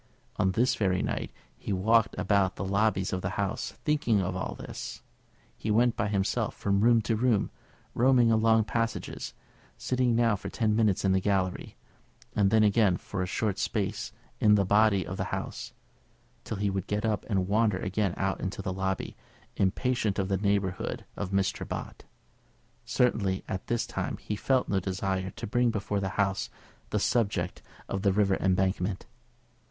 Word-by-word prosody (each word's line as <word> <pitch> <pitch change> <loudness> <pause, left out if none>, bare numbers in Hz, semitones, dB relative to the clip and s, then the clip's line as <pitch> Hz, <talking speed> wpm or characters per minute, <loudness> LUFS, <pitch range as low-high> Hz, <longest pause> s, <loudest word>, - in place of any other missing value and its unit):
On 95 0 +2
this 120 +5 +3
very 95 -3 +1
night - - -3 0.3
he - - -5
walked 110 +4 +3
about 100 -3 +2
the 95 - -4
lobbies 100 -1 +1
of 90 - -1
the 95 +1 -3
House, 100 +1 -2
thinking 145 -8 +2
of 95 0 -1
all 90 - -3
this. - - -7 0.5
He 110 - -5
went 115 +2 +3
by 100 - 0
himself 105 +3 0
from 100 0 0
room 115 0 +5
to 110 +1 0
room, 115 -2 +1 0.4
roaming 125 -1 +4
along 110 0 +4
passages, 115 +1 -3 0.4
sitting 125 -2 +1
now 115 -2 +3
for - - -6
ten 110 -2 +1
minutes 105 -4 +2
in 95 - +4
the 95 - +3
gallery, 95 -2 -1 0.6
and 100 -2 +3
then 110 +1 +4
again 105 -3 +4
for 95 - -5
a 90 - -1
short 105 0 -1
space - - -2 0.3
in 105 -1 +5
the 100 -1 +2
body 100 -1 +4
of - - -5
the - - -1
House, - - -5 0.7
till 110 - -4
he 100 0 0
would 95 0 -3
get 105 +1 -1
up 110 -2 0
and 95 -4 +1
wander 105 -1 +2
again 95 0 -1
out 95 0 -1
into 95 +1 -4
the 95 -1 -2
lobby, 95 0 -2 0.4
impatient 105 +1 0
of 95 0 -1
the 95 - +1
neighbourhood 100 -2 -1
of 100 - -4
Mr. 95 0 0
Bott. - - -6 0.8
Certainly 100 -6 +1
just - - -20
at 95 - -4
this 120 -1 0
time - - -3
he 105 - -4
felt 130 +4 +1
no 100 - +1
desire 95 0 -2
to - - -7
bring 120 +3 +2
before 105 -2 -1
the 95 -1 -2
House 95 -1 0 0.4
the - - 0
subject 100 -7 0 0.3
of 95 - -3
the 100 -1 +3
River 100 -1 +2
Embankment. 95 0 0
100 Hz, 175 wpm, -28 LUFS, 95-110 Hz, 0.8 s, room